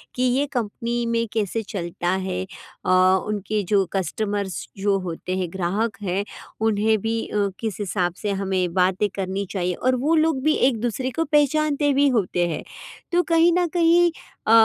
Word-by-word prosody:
कि 250 - 0
ये 255 +3 +2
कम्पनी 235 0 -2
में 230 0 0
कैसे 220 0 -1
चलता 175 -3 -4 0.2
है? 185 0 -2 0.4
अ, - - -1 0.4
उनके 210 0 -1
जो 195 -1 +4
कस्टमर्स 200 0 -2
जो 195 0 +1
होते 180 +2 -4
हैं 185 -2 -2
ग्राहक 195 +5 -1
हैं, 190 +1 0 0.4
उन्हें 220 0 +2
भी 225 +2 -1
अ, 205 -1 0
किस 220 -3 -4
हिसाब 180 -3 -1
से 205 - 0
हमें 190 -3 -1
बातें 185 +2 +2
करनी 195 +1 -2
चाहिए 180 -2 -1
और 255 +6 +1
वो 325 +2 +4
लोग 315 -4 +2
भी 310 +1 +4 0.2
एक-दूसरे 240 +2 -2
को 330 - +2
पहचानते 295 -1 +2
भी 285 +1 +4
होते 180 -3 +1
हैं। 160 - -4 0.5
तो 355 0 +3
कहीं 330 +1 +5
न 355 - +2
कहीं 345 0 +4 0.4
अ - - +4
210 Hz, 170 wpm, -23 LUFS, 190-260 Hz, 0.5 s, कहीं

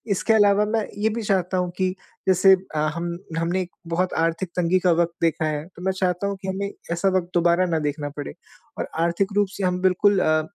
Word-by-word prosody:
इसके 225 - +1
अलावा 205 -1 +4
मैं 215 0 0
ये 220 - +2
भी 230 +2 -3
चाहता 190 -2 0
हूँ 180 -1 -1
कि 185 -1 +1 0.4
जैसे 190 +1 +6 0.2
अ, - - 0 0.2
हम 170 0 -3 0.2
हमने 170 +3 0
एक 180 -1 -6 0.2
बहुत 185 +1 0
आर्थिक 165 +2 0
तंगी 180 +1 +2
का 180 -1 +3
वक़्त 170 0 -1
देखा 160 -1 +1
है, 150 -1 -2
तो 180 -1 -15
मैं 190 - +2
चाहता 185 0 -1
हूँ 200 -1 -3
कि 190 - -6
हमें 200 +1 -3 0.2
ऐसा 180 +3 +1
वक़्त 175 -1 -3
दोबारा 175 +1 +3
ना 165 -2 0
देखना 145 0 -5
पड़े 145 - -5 0.5
और - - -2 0.2
आर्थिक 190 +4 0
रूप 205 - +3
से 200 - -3
हम 180 0 0
बिल्कुल 190 +2 +3
अ, 155 0 +2
180 Hz, 220 wpm, -23 LUFS, 170-195 Hz, 0.5 s, जैसे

